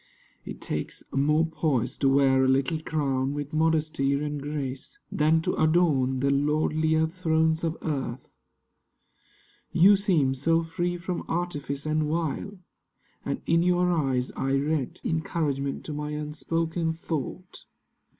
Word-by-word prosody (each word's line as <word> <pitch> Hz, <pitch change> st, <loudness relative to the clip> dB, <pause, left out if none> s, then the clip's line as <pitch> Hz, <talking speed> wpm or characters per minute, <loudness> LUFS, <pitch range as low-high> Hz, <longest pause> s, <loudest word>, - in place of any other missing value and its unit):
(It -, -, -7 dB
takes -, -, -3 dB
more 150 Hz, +4 st, +2 dB
poise 140 Hz, -6 st, -1 dB
to 135 Hz, -, +3 dB
wear 135 Hz, -1 st, +4 dB
a -, -, +3 dB
little 135 Hz, +4 st, +1 dB
crown 140 Hz, -3 st, -1 dB
With 145 Hz, +1 st, -5 dB
modesty 155 Hz, -3 st, +1 dB
and 145 Hz, 0 st, -2 dB
grace 140 Hz, -3 st, -5 dB
Than 160 Hz, +2 st, +2 dB
to -, -, 0 dB
adorn 150 Hz, -6 st, +2 dB
the 140 Hz, 0 st, +2 dB
lordlier 155 Hz, +2 st, +2 dB
thrones 160 Hz, -1 st, +1 dB
of 165 Hz, 0 st, -1 dB
earth.) 135 Hz, -4 st, -4 dB, 1.4 s
You 195 Hz, +4 st, +6 dB
seem 175 Hz, -10 st, +2 dB
so 165 Hz, +5 st, +1 dB
free 175 Hz, +2 st, -2 dB
from 175 Hz, +1 st, -4 dB
artifice 150 Hz, -5 st, -3 dB
and 155 Hz, 0 st, 0 dB
wile: 165 Hz, +5 st, -2 dB, 0.7 s
And -, -, -3 dB
in 165 Hz, +1 st, +3 dB
your 180 Hz, 0 st, +2 dB
eyes 135 Hz, -6 st, 0 dB
I 135 Hz, 0 st, -2 dB
read 140 Hz, -1 st, -1 dB
Encouragement 150 Hz, -4 st, -2 dB
to 155 Hz, -, -5 dB
my 150 Hz, 0 st, -4 dB
unspoken 160 Hz, +2 st, -2 dB
thought. 165 Hz, +2 st, -5 dB
155 Hz, 130 wpm, -26 LUFS, 140-165 Hz, 1.4 s, You